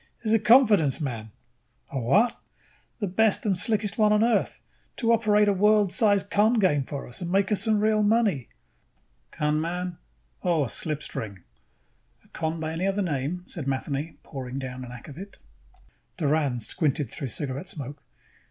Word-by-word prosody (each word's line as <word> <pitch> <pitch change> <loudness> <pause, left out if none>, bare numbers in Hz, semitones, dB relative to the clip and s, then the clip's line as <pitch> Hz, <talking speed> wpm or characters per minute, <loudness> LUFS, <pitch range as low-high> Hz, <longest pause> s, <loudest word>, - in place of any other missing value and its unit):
is 220 -1 +1
a 225 - +5
confidence 210 - +5
man." 115 -7 -4 0.6
"A 135 - -2
what?" 205 - +2 0.6
"The 210 - -1
best 205 +4 +1
and 200 -3 +2
slickest 210 +3 -1
one 210 -1 +5
on 210 +1 +4
Earth, 235 0 0 0.3
to 230 -2 +2
operate 210 -2 +3
a 205 - +4
world 210 0 +3
size 205 -3 +3
con 210 +4 +2
game 180 - +2
for 140 0 -6
us 120 - -8
and 175 - -3
make 195 +1 +2
us 210 - +1
some 220 -2 +2
real 215 0 +2
money." 205 - +2 0.8
"Con 150 0 0
man? 175 +1 -4 0.4
Oh. 170 -4 +2
A 130 - -3
slipstring." 110 - -3 0.8
"A - - -22
con 160 0 -3
by 160 0 -3
any 170 +4 -1
other 195 +1 0
name," 160 +2 -2
said 155 -7 -6
Matheny, 140 +3 -3
pouring 130 -3 -6
down 130 -1 -5
an 125 - -9
akvavit. 145 - -10 0.8
Doran 145 -5 +1
squinted 140 - -1
through 140 - -5
cigarette 140 +6 -4
smoke. 140 -1 -7
175 Hz, 160 wpm, -26 LUFS, 140-210 Hz, 0.8 s, a